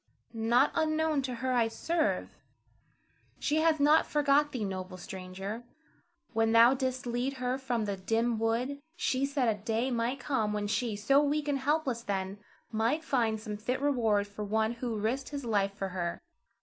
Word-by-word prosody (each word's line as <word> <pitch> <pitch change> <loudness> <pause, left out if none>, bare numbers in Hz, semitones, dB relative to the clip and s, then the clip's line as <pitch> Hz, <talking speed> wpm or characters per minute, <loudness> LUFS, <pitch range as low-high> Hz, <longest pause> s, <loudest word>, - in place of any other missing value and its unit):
Not 235 +4 +3
unknown 315 -2 +1
to 255 -2 -4
her 255 - +1
I 235 -2 +3
serve. 320 +8 -1 1.0
She 300 - 0
hath 315 -1 +3
not 295 +2 +5
forgot 295 0 +3
thee, 230 -5 -2
noble 185 -1 -5
stranger. 190 +4 -6 0.7
When 225 0 +2
thou 230 +2 +7
didst 260 -1 -2
lead 245 +3 -1
her 255 0 -2
from 245 -4 -1
the 200 -1 -2
dim 225 +4 0
wood, 240 +5 0 0.2
she 275 -6 0
said 275 -3 0
a 210 -3 0
day 225 +4 0
might 240 +3 -1
come 225 -7 0
when 210 -1 -1
she, 220 +1 -1
so 275 +8 +4
weak 295 0 0
and 285 -1 +1
helpless 275 -4 0
then, 195 -2 -3 0.3
might 230 +8 +1
find 230 -7 +1
some 210 -1 -5
fit 245 +5 -2
reward 230 -8 +2
for 205 +1 -7
one 220 +2 +1
who 235 -2 -3
risked 235 +6 -1
his 280 -3 -5
life 200 -3 +1
for 195 -2 -3
her. 175 -2 -3
235 Hz, 175 wpm, -30 LUFS, 215-275 Hz, 1.0 s, thou